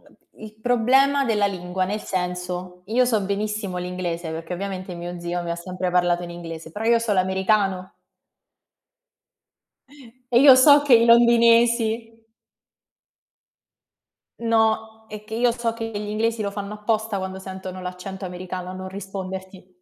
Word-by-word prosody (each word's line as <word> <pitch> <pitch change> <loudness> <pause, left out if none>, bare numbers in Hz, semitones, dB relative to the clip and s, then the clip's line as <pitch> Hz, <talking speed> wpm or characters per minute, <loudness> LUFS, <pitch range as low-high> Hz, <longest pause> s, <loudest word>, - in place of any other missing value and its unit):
ehm, - - -18 0.3
il 215 0 -12
problema 265 +4 +3
della 210 -4 +2
lingua, 185 -1 -3
nel 205 +3 -3
senso: 180 -1 -4
io 240 +5 +2
so 230 -4 +1
benissimo 200 -1 -3
l'inglese 180 -2 -4
perché 165 +2 -5
ovviamente 185 -1 -5
mio 175 0 -7
zio 175 0 -3
mi 170 - -5
ha 170 - -2
sempre 180 +1 -4
parlato 175 -1 +2
in 175 - -7
inglese, 165 -2 -8
però 215 +6 -5
io 235 0 +5
so 230 -2 -1
l'americano. 190 0 0 2.4
E 240 0 +5
io 275 -2 +9
so 285 +2 +7
che 280 -4 +5
i 230 0 +6
londinesi 235 -1 +4 2.2
No, 220 -1 0
è 210 0 -8
che 220 +1 -8
io 240 +1 +2
so 230 -1 -2
che 225 -1 -5
gli 205 -1 -5
inglesi 225 +2 -1
lo 200 - -2
fanno 200 0 -6
apposta 215 -1 -1
quando 190 0 -5
sentono 190 -1 -8
l'accento 185 +2 -7
americano 180 0 -6
a - - -6
non 185 0 -7
risponderti. 190 -1 -7
200 Hz, 150 wpm, -23 LUFS, 180-225 Hz, 2.4 s, io